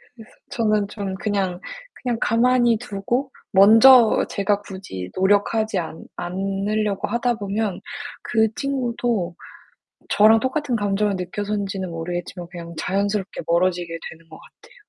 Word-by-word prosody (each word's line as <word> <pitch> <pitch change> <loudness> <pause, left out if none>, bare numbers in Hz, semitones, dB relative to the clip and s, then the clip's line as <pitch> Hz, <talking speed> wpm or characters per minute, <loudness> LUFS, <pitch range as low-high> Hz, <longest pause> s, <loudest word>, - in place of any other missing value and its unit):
그래서 225 -3 -14 0.2
저는 215 -3 +1
좀 200 -3 -5
그냥, 195 -4 -2 0.4
그냥 240 -3 -1
가만히 240 0 +3
두고 245 +4 -3 0.2
먼저 225 +4 +7
제가 200 +1 0
굳이 185 - -8
노력하지 205 +2 +2
않 165 -1 -6
않으려고 195 +3 -2
하다 240 +2 0
보면 205 -2 -3 0.4
그 220 -2 +2
친구도 240 -9 -2 0.8
저랑 220 +2 +6
똑같은 260 +1 -1
감정을 205 -1 0
느껴서인지는 195 0 -3
모르겠지만 175 +1 -5
그냥 170 -1 -8
자연스럽게 200 +1 -2
멀어지게 175 -1 0
되는 165 0 -15
것 155 - -11
같아요. - - -19
205 Hz, 300 characters per minute, -22 LUFS, 185-225 Hz, 0.8 s, 먼저